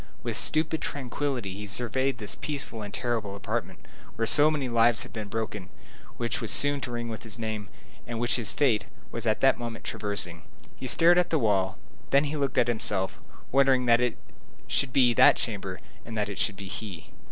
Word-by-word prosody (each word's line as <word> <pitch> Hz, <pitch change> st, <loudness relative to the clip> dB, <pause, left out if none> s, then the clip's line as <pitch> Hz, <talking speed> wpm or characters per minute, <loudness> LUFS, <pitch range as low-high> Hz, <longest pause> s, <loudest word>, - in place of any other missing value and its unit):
With -, -, -3 dB
stupid 155 Hz, +1 st, +1 dB
tranquillity 130 Hz, -6 st, -3 dB
he 105 Hz, +2 st, -7 dB
surveyed 125 Hz, +5 st, 0 dB
this 105 Hz, -3 st, -2 dB
peaceful 140 Hz, -6 st, -5 dB
and 105 Hz, -1 st, -6 dB
terrible 110 Hz, -5 st, -2 dB
apartment, 100 Hz, -, -4 dB, 0.3 s
where 115 Hz, -, 0 dB
so 150 Hz, +6 st, +6 dB
many 145 Hz, -4 st, -1 dB
lives 115 Hz, 0 st, +3 dB
had -, -, -13 dB
been 110 Hz, -2 st, -5 dB
broken, 105 Hz, -3 st, -4 dB, 0.5 s
which 115 Hz, -1 st, -2 dB
was 115 Hz, -, -3 dB
soon 145 Hz, +4 st, +3 dB
to 125 Hz, -, -5 dB
ring 120 Hz, 0 st, -3 dB
with 110 Hz, -1 st, -6 dB
his 110 Hz, -2 st, -3 dB
name, 110 Hz, -3 st, -4 dB, 0.4 s
and 120 Hz, -1 st, -4 dB
which 120 Hz, +1 st, +1 dB
his 115 Hz, -3 st, 0 dB
fate 125 Hz, -8 st, +2 dB, 0.3 s
was -, -, -2 dB
at -, -, +1 dB
that -, -, +4 dB
moment 115 Hz, -1 st, -6 dB
traversing. 90 Hz, -5 st, -1 dB, 0.3 s
He 130 Hz, -, -6 dB
stared 165 Hz, +10 st, +6 dB
at 180 Hz, -, +1 dB
the 160 Hz, -, +2 dB
wall, 100 Hz, -6 st, +1 dB, 0.3 s
then 140 Hz, +1 st, +4 dB
he 150 Hz, +1 st, -3 dB
looked 140 Hz, -3 st, -1 dB
at 120 Hz, -, +4 dB
himself, 105 Hz, -5 st, 0 dB, 0.3 s
wondering 135 Hz, -1 st, +4 dB
that 120 Hz, 0 st, +5 dB
it 125 Hz, -2 st, 0 dB, 0.5 s
should 140 Hz, -2 st, 0 dB
be 125 Hz, -2 st, +4 dB
that -, -, +7 dB
chamber 95 Hz, -4 st, -4 dB, 0.2 s
and 115 Hz, -2 st, -7 dB
that 105 Hz, -1 st, -1 dB
it 100 Hz, -, -5 dB
should 100 Hz, -, +1 dB
be 100 Hz, -, -7 dB
he. 100 Hz, -5 st, -7 dB
115 Hz, 200 wpm, -27 LUFS, 105-130 Hz, 0.5 s, that